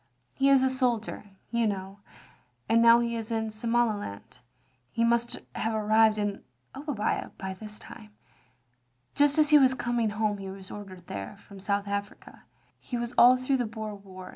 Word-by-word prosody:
He 275 0 +2
is 270 -1 +5
a 265 - +3
soldier, 240 -5 -1 0.3
you 235 -1 +1
know, 195 0 -4 0.7
and 230 0 +4
now 235 0 +7
he 235 0 -1
is 225 -1 -5
in 220 -1 -1
Somaliland. 215 - -2 0.5
He 230 - 0
must 235 0 +1 0.2
have 220 0 -2
arrived 215 0 +3
in 205 -1 -2 0.3
Obbia 280 -7 -2
by 190 0 -5
this 210 +2 -9
time. 215 -3 -12 1.0
Just 290 0 +3
as 305 -1 +4
he 300 -1 +8
was 260 -1 +4
coming 240 -3 0
home 210 -1 -1
he 195 -1 -6
was 190 -1 -9
ordered 190 -4 -10
there, 100 - -7
from 200 -1 -14
South 200 +1 -1
Africa. 200 0 -6 0.3
He 245 - -5
was 240 0 -4
all 250 +1 +7
through 255 +2 0
the 245 -3 -1
Boer 215 -1 -6
War. 190 -2 -11
220 Hz, 170 wpm, -28 LUFS, 200-240 Hz, 1.0 s, he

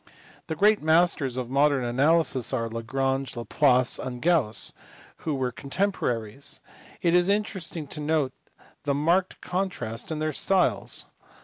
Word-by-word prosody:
The 160 - -3
great 210 +5 +4
masters 160 -5 +3
of 125 -1 -4
modern 140 -1 +3
analysis 135 +1 +2
are 115 -3 0
Lagrange, 135 +4 -2
Laplace, 125 +1 +2
and 125 -1 -5
Gauss, 150 -9 +2 0.4
who 155 -3 -3
were 130 -2 -1
contemporaries. 135 - -2 0.4
It 170 -1 +3
is 175 +1 +4
interesting 190 -6 -1
to 150 - -5
note 150 -3 0 0.5
the 140 -1 0
marked 170 +6 +1
contrast 180 - -3
in 160 - -2
their 155 0 -1
styles. 190 -2 +1
145 Hz, 130 wpm, -26 LUFS, 130-170 Hz, 0.5 s, great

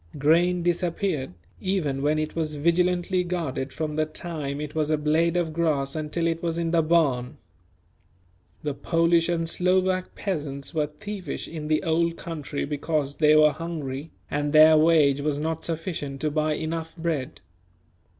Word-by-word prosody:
Grain 170 +5 +3
disappeared, 170 - -1 0.2
even 160 -8 -1
when 150 +2 +2
it 155 0 -3
was 155 -2 -1
vigilantly 180 +3 +1
guarded 160 -7 -3
from 155 0 -3
the 155 - +2
time 155 -4 -5
it 150 0 -5
was 155 -1 0
a 155 - +2
blade 160 +3 +2
of 165 -3 -1
grass 155 -4 0
until 155 +2 -2
it 165 0 0
was 165 -1 -2
in 165 -1 -1
the 170 -1 +4
barn. 150 -7 +1 1.3
The 150 -1 -1
Polish 165 +3 +2
and 165 -1 0
Slovak 185 +1 +1
peasants 145 -8 -4
were 155 -2 +1
thievish 185 +1 -6
in 155 -2 -6
the 155 0 +1
Old 170 0 +1
Country 150 -4 -4
because 145 0 -2
they 155 -1 +5
were 155 0 +6
hungry, 155 -3 -5 0.2
and 145 +1 -1
their 155 +1 +8
wage 155 -3 +4
was 145 -1 0
not 160 +2 -3
sufficient 160 -4 -4
to 150 - 0
buy 155 0 +1
enough 160 +2 -4
bread. 160 -4 -3
160 Hz, 160 wpm, -25 LUFS, 150-170 Hz, 1.3 s, their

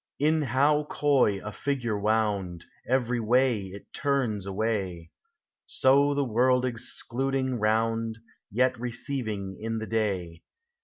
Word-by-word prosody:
In 155 +2 +2
how 145 +3 +2
coy 135 -10 +2
a 105 - -5
figure 125 -2 -2
wound, 100 -4 0 0.2
Every 125 -1 +1
way 115 -2 +2
it 95 +2 -12
turns 125 -9 -1
away; 95 -5 -2 0.6
So 140 +2 +3
the 140 - +1
world 125 +2 +2
excluding 130 +1 -2
round, 115 +1 0 0.3
Yet 130 +3 +1
receiving 115 -6 -3
in 115 0 -2
the 110 - -3
day. 95 -7 -2
115 Hz, 115 wpm, -27 LUFS, 105-130 Hz, 0.6 s, So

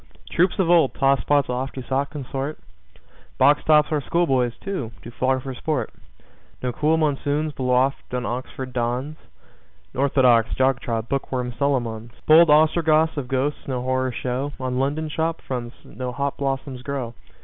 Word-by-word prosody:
Troops 180 +4 +2
of 190 -4 +2
old 165 -5 +4
tosspots 140 +1 +2
oft 125 +2 -3
to 130 - -5
sot 135 +2 -1
consort. 140 0 -5 0.8
Box 145 +1 +4
tops 150 0 +4
our 150 -2 +1
schoolboys, 130 -7 +1
too, 190 - -4
do 120 - -9
flog 130 +2 0
for 135 - -5
sport. 150 +2 -2 0.7
No 125 -1 -1
cool 155 +5 +2
monsoons 150 0 0
blow 125 -2 0
oft 135 +2 0
on 125 -1 -2
Oxford 130 +1 -5
dons. 125 +5 -2 0.8
Orthodox, 130 -4 +3
jog 130 0 +2
trot, 115 -3 -3
book 135 +2 -2
worm 125 -2 -2
Solomons! 120 -4 -1
Bold 160 +1 +7
Ostrogoths 155 +1 +4
of 140 -4 -4
ghosts 135 +3 -2
no 125 -2 -2
horror 130 0 0
show. 130 +4 -3
On 130 -1 -2
London 145 +4 -1
shop 160 +2 -2
fronts 120 -2 -5
no 125 -1 -5
hop 140 +2 -2
blossoms 135 -2 -3
grow. 130 -3 -4
135 Hz, 160 wpm, -23 LUFS, 125-150 Hz, 0.8 s, Bold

